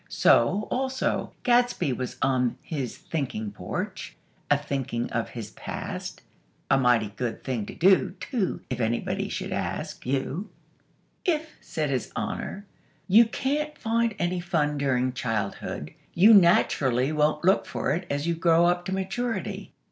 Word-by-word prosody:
So, 195 - +3
also, 260 0 -1
Gadsby 240 - +3
was 125 0 -5
on 130 -2 +1
his 135 -7 -4
thinking 125 -9 -3
porch, 105 - -5 0.3
a 145 - +5
thinking 135 -5 -3
of 115 -1 -1
his 110 -3 -7
past. - - -6 0.5
(A 135 - +5
mighty 120 -4 +3
good 120 -3 -3
thing 120 -6 -2
to - - -8
do, 185 +1 +4
too; 225 -8 -2
if 125 - -2
anybody 115 0 -1
should - - -4
ask - - -4
you!) 140 +9 -2 0.7
"If," 315 -4 0
said 150 -3 -2
His 130 -3 -2
Honor, 200 +2 -4 0.4
"you 215 +5 +7
can't 290 +6 -2
find 230 -1 0
any 175 0 0
fun 155 -5 0
during 130 -2 +1
childhood, 115 -6 -3 0.2
you 205 +6 +8
naturally 145 - +4
won't 150 +1 +1
look 190 +2 +4
for - - -2
it 175 +3 -3
as 145 +1 -1
you 170 - +1
grow 165 0 +4
up 175 0 +1
to 190 - -3
maturity. 190 +1 -3
155 Hz, 145 wpm, -26 LUFS, 130-195 Hz, 0.7 s, you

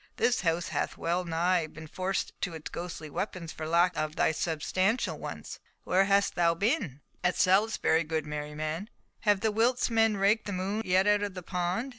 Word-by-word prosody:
This 245 - +2
house 170 -1 0
hath 145 -2 -2
well 175 +2 -1
nigh 170 0 +1
been 155 +1 -11
forced 185 +5 -2
to 175 -3 -2
its 155 - -7
ghostly 170 -2 -6
weapons 170 +1 -4
for 155 - -6
lack 170 +2 +3
of 155 0 -2
thy - - +3
substantial 180 +8 0
ones. - - -7 0.2
Where 190 +2 +3
hast 200 0 +3
thou 170 -1 +2
been?" 200 - -1 0.2
"At 180 - +2
Salisbury, 190 -3 +3
good 155 -1 -2
Merryman." 150 +5 -4 0.4
"Have 205 -2 +4
the 220 -1 +2
Wilts 235 +3 +2
men 225 -2 +3
raked 205 +3 +2
the 205 - -3
moon 195 +4 -2
yet 185 +1 +3
out 210 0 +4
of 205 -2 -3
the 180 - -6
pond? 180 +9 -2
180 Hz, 185 wpm, -29 LUFS, 160-205 Hz, 0.4 s, Have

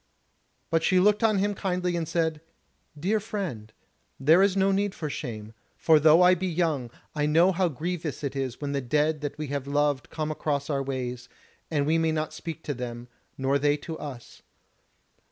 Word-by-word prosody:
But 165 0 +3
she 185 +3 +3
looked 210 +4 +3
on 215 -2 +4
him 205 +2 +1
kindly 180 -2 -1
and 165 -2 -2
said: 160 -2 -1 0.6
"Dear 200 +7 +1
friend, 185 - -5 0.5
there 155 +7 +5
is 195 -1 +3
no 195 0 +3
need 200 0 0
for 155 -3 -4
shame; 110 -6 -6 0.2
for 160 -2 +5
though 155 +3 +6
I 180 +1 +7
be 185 +1 -1
young, 160 -8 0 0.2
I 150 -1 0
know 165 +5 +5
how 180 -1 +1
grievous 160 0 -4
it 140 -1 -3
is 130 -3 -3
when 145 -1 -3
the 140 -1 -1
dead 150 +4 +1
that 145 0 -4
we 150 -2 -4
have 140 -1 -3
loved 145 -1 0
come 155 -1 -3
across 145 -1 -2
our 140 -1 0
ways, 125 -2 -4 0.4
and 145 -3 +1
we 160 +2 +2
may 160 0 +2
not 155 0 -2
speak 160 0 -7
to 145 - -2
them, 120 -1 -6 0.3
nor 135 +1 +1
they 145 +1 +2
to 160 +2 -7
us. 130 -5 -9
155 Hz, 190 wpm, -27 LUFS, 140-180 Hz, 0.6 s, I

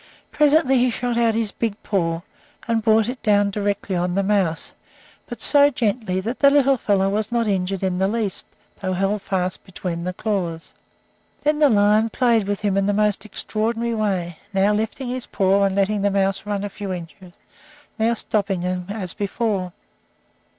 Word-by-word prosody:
Presently 290 -3 +3
he 250 +1 +3
shot 245 0 -2
out 230 -2 +2
his 225 -2 -1
big 225 -3 -2
paw, 165 -5 -1 0.5
and 230 -1 +1
brought 220 0 +4
it 250 +1 -5
down 205 -1 +3
directly 200 -1 -2
on 175 0 -1
the 195 - +1
mouse, 190 -5 0 0.6
but 240 -3 -7
so 285 +4 +5
gently 220 -7 -1
that 230 +6 -4
the 280 - +7
little 275 -1 +4
fellow 200 -4 +1
was 210 +3 -1
not 235 -2 +1
injured 195 -1 -1
in 185 -1 0
the 190 - +2
least, 215 -2 -2 0.3
though 185 -1 -1
held 195 +2 0
fast 185 -2 -2
between 175 -3 -5
the 180 - -2
claws. 180 -6 -3 0.7
Then 300 0 +1
the 295 -2 +5
lion 210 0 +3
played 230 -3 +2
with 200 -1 -2
him 200 -2 0
in 195 0 +1
the 205 - +2
most 210 0 +1
extraordinary 225 +3 -2
way, 190 -6 -2 0.2
now 195 +2 +3
lifting 220 +5 -2
his 255 0 -4
paw 195 0 +2
and 195 -1 0
letting 200 +1 +1
the 200 - +2
mouse 195 +1 0
run 205 -1 -2
a 205 - -3
few 200 -1 -6
inches, 175 +1 -8 0.7
now 230 +1 +2
stopping 200 -4 -1
him 180 0 -3
as 200 -4 -3
before. 200 -2 -2
205 Hz, 180 wpm, -22 LUFS, 190-225 Hz, 0.7 s, the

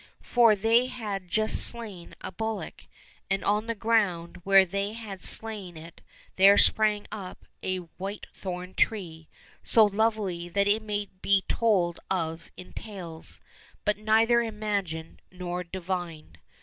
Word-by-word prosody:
" - - -48
For 235 -3 +6
they 230 +5 +3
had 205 -7 -5
just 215 +4 +1
slain 210 -7 -3
a - - -6
bullock, 220 +3 -5 0.4
and 195 -1 0
on 210 +2 +1
the 230 - -2
ground 200 -7 0
where 195 0 +6
they 200 +3 -3
had 210 -5 -8
slain 205 -6 0
it 165 +2 -12 0.4
there 195 +2 +7
sprang 210 -1 +4
up 195 -4 -8 0.2
a 185 0 -1 0.2
whitethorn 185 -2 -6
tree, 165 -7 -1 0.3
so 220 -2 +5
lovely 205 -4 0
that 200 +3 +1
it 210 +2 +2
may 205 -2 -3
be 195 -1 +3
told 185 -7 +1
of 165 -3 -2
in 180 - -11
tales, 175 -7 -7 0.5
but 210 0 +1
neither 225 +2 +4
imagined 205 -8 -3
nor 180 -1 -4
divined. 175 -3 -5
200 Hz, 135 wpm, -27 LUFS, 180-215 Hz, 0.5 s, there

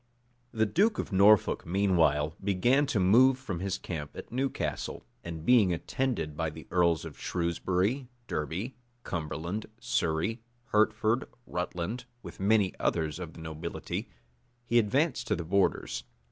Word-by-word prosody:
[*] 120 0 -40
The 110 -2 +2
duke 205 - +2
of - - -3
Norfolk, 100 +1 +5
meanwhile, 80 -5 +2
began 120 +9 +3
to 110 - 0
move 125 +8 +6
from 110 -10 -5
his 95 0 -2
camp 75 -4 -6
at - - -8
Newcastle; 130 +3 -2 0.2
and 80 -1 -6
being 115 -7 +5
attended 85 - -2
by 80 0 -1
the 75 -1 -10
earls 85 -2 +2
of - - -9
Shrewsbury, 95 +8 0 0.2
Derby, 90 - -3 0.3
Cumberland, 85 +4 -4
Surrey, 110 -1 0 0.3
Hertford, 110 +2 +2 0.2
Rutland, 90 +7 -3 0.2
with 85 - -10
many 100 -1 +3
others 80 -1 0
of 85 -3 -6
the 85 - -11
nobility, 80 +1 -5 0.6
he 120 0 +4
advanced 130 +4 +1
to - - +2
the 85 - -5
borders. 100 +4 +1
95 Hz, 140 wpm, -29 LUFS, 85-120 Hz, 0.6 s, move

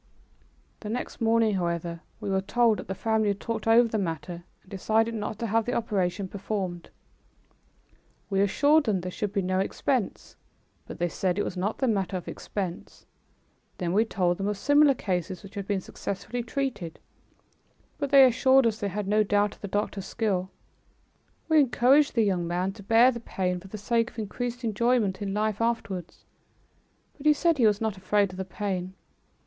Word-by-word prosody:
The 210 - -7
next 240 +2 -4
morning, 225 -1 +3
however, 170 -2 -2 0.2
we 205 -3 -3
were 190 0 +1
told 225 +2 +2
that - - -8
the 190 - -3
family 220 +1 +1
had 200 -1 0
talked 225 -1 -4
over 230 +1 +6
the 220 -1 -1
matter 170 -1 -4 0.2
and - - -22
decided 220 +4 +1
not 215 0 -4
to 235 - -3
have 225 0 +1
the 245 - -1
operation 200 -4 -1
performed. 190 -3 -4 1.4
We 195 -1 +1
assured 290 +10 +3
them 200 -5 +1
there 180 +1 -5
should 205 +2 -3
be 200 -2 -1
no 185 +1 0
expense, 240 +3 -2 0.5
but - - -8
they 175 - 0
said 180 +2 -1
it 205 - +1
was - - -4
not 195 +4 -2
the 265 - 0
matter 195 -4 0
of 180 - -9
expense. 185 -4 -6 0.7
Then 175 -2 -2
we 215 +3 +4
told 180 -5 0
them 195 - -1
of 205 -1 -1
similar 290 +4 +4
cases 185 -2 -3
which 195 +1 -12
had 200 -2 -5
been 200 -2 0
successfully 200 +7 -5
treated, 235 - -3 1.0
but 285 -2 -1
they 275 -1 +8
assured 260 +1 +4
us 220 -2 0
they 205 - -1
had 200 +1 -4
no 210 +1 +3
doubt 205 0 +2
of - - -20
the 200 - -4
doctor's 200 -1 -2
skill. 190 -5 -1 1.0
We 315 -1 +5
encouraged 270 +2 +4
the 230 - +4
young 180 -4 0
man 180 +3 -1
to 205 +1 -12
bear 230 +5 +5
the 235 - -6
pain 180 -5 -2
for 190 - -13
the 215 - -7
sake 230 +3 0
of - - -21
increased 245 +3 -4
enjoyment 220 -2 +1
in 200 -1 -2
life 215 0 0
afterwards, 200 -7 -3 0.9
but 300 +1 -3
he 300 - +7
said 325 0 +1
he 230 - +6
was 210 -1 +2
not 220 -3 -2
afraid 200 +1 +1
of 185 - -10
the 190 - -3
pain. 190 -1 -4
205 Hz, 190 wpm, -27 LUFS, 190-230 Hz, 1.4 s, they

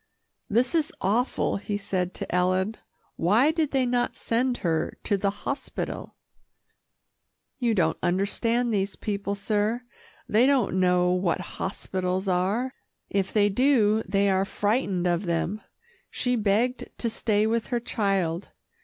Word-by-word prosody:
"This 240 +7 +2
is 320 -2 +2
awful," 220 +5 +1
he 205 +1 -3
said 185 -2 -2
to - - -5
Ellen. 185 +4 +1 0.4
"Why 220 - +4
did 320 -2 0
they 265 -2 +1
not 245 0 0
send 245 +2 0
her 160 -1 0
to 205 - +1
the 200 0 +1
hospital?" 205 +8 -5 1.4
"You 235 -3 +1
don't 160 -4 +1
understand 230 +6 +1
these 195 -1 0
people, 200 -1 -3
sir. 210 +4 0 0.4
They 230 +5 +4
don't 250 -9 +2
know 180 -1 +3
what 180 -2 +1 0.2
hospitals 190 0 -2
are. 195 +8 0 0.4
If 195 -1 0
they 205 -1 +4
do, 220 -1 +3
they 200 +1 +2
are 190 0 +2
frightened 205 -2 0
of 175 +1 0
them. 170 +5 -1 0.5
She 250 -1 0
begged 225 +4 +1
to 235 - -1
stay 215 -2 +1
with 225 +1 0
her 240 -2 0
child. 195 -7 -1
205 Hz, 135 wpm, -26 LUFS, 185-240 Hz, 1.4 s, Why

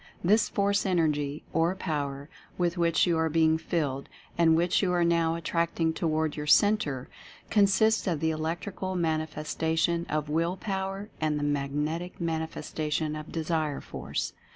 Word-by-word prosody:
This 210 +5 +4
Force, 200 0 +1
Energy 150 -6 0
or 170 +3 +2
Power 145 -6 -3 0.3
with 175 -1 +1
which 170 -2 +3
you 170 -3 +1
are 160 0 +2
being 160 0 +3
filled, 150 -5 -2 0.3
and 165 -1 +4
which 170 +2 +2
you 185 -3 +1
are 175 -1 +3
now 170 -1 +2
attracting 165 0 0
toward 160 -2 0
your 150 0 -5
Cen 205 +7 +6
tre, 135 -10 -4 0.5
consists 220 +1 +3
of 165 -5 0
the 160 +1 +1
Electrical 170 +4 -3
Manifestation 160 +1 0
of 155 -1 -1
Will 165 +4 0
Power 195 +1 -3
and 155 -1 +1
the 145 - -2
Magnetic 150 +4 -2
Manifestation 160 -2 -2
of 155 0 -7
Desire 155 -3 -1
Force. - - -4
165 Hz, 150 wpm, -28 LUFS, 155-175 Hz, 0.5 s, Cen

